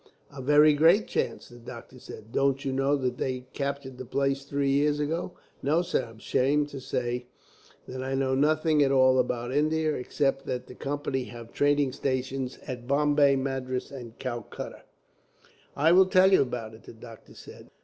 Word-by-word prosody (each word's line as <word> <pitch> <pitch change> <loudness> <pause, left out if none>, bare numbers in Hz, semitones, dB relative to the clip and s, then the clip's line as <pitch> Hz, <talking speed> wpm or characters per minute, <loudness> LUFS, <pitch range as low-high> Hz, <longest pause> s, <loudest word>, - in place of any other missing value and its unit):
"A 135 - -6
very 150 +3 +5
great 165 +8 +4
chance," - - -2
the 120 0 -14
doctor 120 +2 -11
said. 110 -2 -11
"Don't 135 +1 +1
you 135 - 0
know 135 +2 +2
that 125 -3 -2
they 130 -1 -3
captured 140 -2 -4
the - - -5
place 135 +2 -1
three 140 0 -1
years 145 +1 +2
ago?" 165 +4 -2 0.3
"No, 155 +5 +2
sir; 150 - -1
I'm 115 - -14
ashamed 145 +6 +1
to 140 -2 -8
say 125 -1 -3 0.6
that 130 0 -6
I 135 +1 -2
know 135 0 0
nothing 155 +2 +2
at 135 -1 +3
all 130 -1 +5
about 120 0 -1
India, 155 +1 +1
except 135 +1 -1
that 125 -1 -3
the - - -11
Company 135 -1 -3
have 115 -1 -11
trading 145 -1 +2
stations 130 -1 -3
at 125 -2 -7
Bombay, 145 0 +3
Madras, 130 -1 -3
and 120 -4 -9
Calcutta." 120 -4 -6 0.9
"I 155 +4 +3
will 185 +2 +6
tell 190 0 +5
you - - +6
about 120 -4 -3
it," 110 - -14
the - - -12
doctor 115 0 -14
said. - - -13
135 Hz, 180 wpm, -27 LUFS, 125-145 Hz, 0.9 s, will